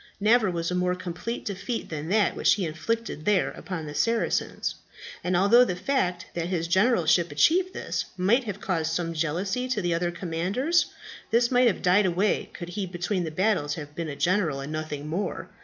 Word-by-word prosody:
Never 215 0 +4
was 170 -1 -2
a - - -1
more 180 0 +1
complete 185 +6 -5
defeat 205 +4 -4
than 155 0 -5
that 210 +1 +2
which - - +4
he 195 -3 -2
inflicted 170 +3 -3
there 205 -1 +2
upon 165 -5 -6
the 150 - -7
Saracens; 230 +8 0 0.5
and 180 0 +1
although 210 +7 +6
the 180 -8 -1
fact 180 -5 -1
that 170 -1 -2
his 170 -2 -1
generalship 175 -4 +3
achieved 355 - +3
this, - - -3
might 220 +8 +3
have 205 -2 -5
caused 165 -5 -1
some 165 0 -1
jealousy 180 +10 -1
to 255 -4 -1
the 175 -3 0
other 175 +1 0
commanders, 185 - 0 0.4
this 235 +2 +3
might 250 0 +5
have 225 - 0
died 190 +2 +4
away 185 +4 0
could 175 -1 -8
he 190 +1 -3
between 180 +1 -2
the - - -3
battles 155 -4 0
have 150 -2 -8
been 165 0 -4
a 140 - -5
general, 175 -4 +1
and 140 +2 -6
nothing 155 -2 -4
more. 175 +6 -3
180 Hz, 190 wpm, -26 LUFS, 165-210 Hz, 0.5 s, although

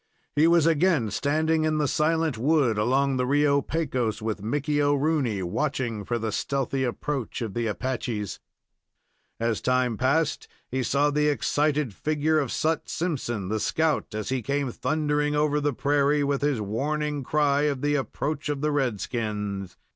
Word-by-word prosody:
He 155 +3 +5
was 170 -2 +4
again 160 - +2
standing 155 +5 +1
in 155 0 +1
the 150 -1 +1
silent 160 0 +1
wood 130 -2 +2
along 135 +4 +2
the 125 - +1
Rio 140 +1 +3
Pecos, 130 -9 -1
with 110 -2 -3
Mickey 145 +6 0
O'Rooney, 145 -7 +1
watching 115 +1 -2
for 120 - -1
the 110 -1 -2
stealthy 135 +3 -1
approach 130 0 -3
of 110 -4 -5
the 120 -1 -1
Apaches. 110 -1 -3 1.0
As 115 -1 0
time 125 -3 +1
passed, 140 +6 +1 0.2
he 130 +1 0
saw 140 +3 +2
the 150 +1 +2
excited 150 -3 +1
figure 155 +5 +1
of 140 -4 -2
Sut 160 +1 -1
Simpson 120 - -2
the 110 +1 0
scout, 155 0 0
as 110 -1 -3
he 130 -1 0
came 140 +1 -1
thundering 150 +3 0
over 150 0 +2
the 145 0 +1
prairie, 145 +2 +2
with 140 -1 0
his 145 -4 +1
warning 145 +7 -2
cry 145 +1 +2
of 140 -3 -3
the 145 0 +2
approach 145 +2 -2
of 145 -2 -2
the 150 0 +1
red 130 -8 0
skins. 105 -5 -4
140 Hz, 160 wpm, -26 LUFS, 120-150 Hz, 1.0 s, He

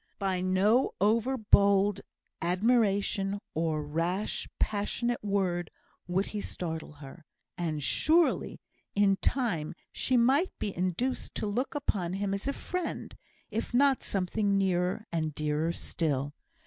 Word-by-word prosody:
By 190 -3 -1
no 195 +7 +3
over 230 +6 +2
bold 200 -2 +4 0.4
admiration, 200 +1 +2 0.2
or 160 -1 0
rash, 170 +7 -2
passionate 225 +3 -1
word, 185 -4 0 0.4
would 185 +3 +1
he 210 - -4
startle 160 -5 -5
her; 145 +3 -12 0.3
and, 155 -4 -2
surely, 325 - +2 0.4
in 200 -1 +4
time 205 - -1 0.2
she 255 - +1
might 270 +9 +3
be 200 - -3
induced 185 +9 -2
to - - -2
look 240 +8 -2
upon 185 -11 -1
him 195 0 -1
as 200 +6 -3
a 280 - +1
friend, 360 +3 -4 0.4
if 225 +2 -3
not 275 0 +4
something 200 +1 0
nearer 185 +2 0
and 155 -3 -2
dearer 150 +2 0
still. 145 -4 -1
195 Hz, 125 wpm, -30 LUFS, 170-220 Hz, 0.4 s, bold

